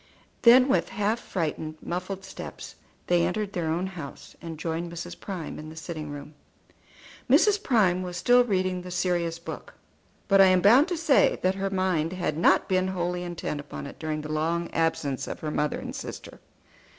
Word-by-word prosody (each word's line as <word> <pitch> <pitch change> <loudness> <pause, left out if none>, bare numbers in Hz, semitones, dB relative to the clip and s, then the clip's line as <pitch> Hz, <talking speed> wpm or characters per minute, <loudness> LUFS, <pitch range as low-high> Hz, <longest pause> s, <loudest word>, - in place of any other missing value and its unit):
Then 250 +2 +7
with 180 -10 +1
half 210 +3 0
frightened, 155 -5 -3
muffled 185 +2 -5
steps 190 - -8 0.3
they 175 -1 +3
entered 200 +3 -1
their 170 -3 -2
own 170 +3 0
house, 170 -7 -9
and 165 -2 -7
joined 165 +2 -3
Mrs. 170 +1 -7
Prime 185 -6 -6
in 155 0 -8
the 160 - -11
sitting 160 -2 -6
room. 145 +1 -8 1.0
Mrs. 395 - +5
Prime 190 - +2
was 180 -1 -5
still 245 +7 +5
reading 185 -5 0
the 180 - -9
serious 175 -2 0
book; 170 - -9 0.5
but 195 -1 +6
I - - +9
am 185 -1 +5
bound 245 - +6
to 355 -2 -2
say 315 -4 +4
that 185 +1 +3
her 195 0 -2
mind 185 -4 0
had 175 -5 -2
not 165 - +3
been 185 0 +1
wholly 180 -1 -2
intent 175 -4 -4
upon 145 - -7
it 140 - -10
during 155 -1 -3
the 155 0 -5
long 165 +2 -1
absence 145 -5 -1
of - - -6
her 155 - -3
mother 150 -1 0
and - - -6
sister. - - -8
175 Hz, 185 wpm, -26 LUFS, 160-195 Hz, 1.0 s, I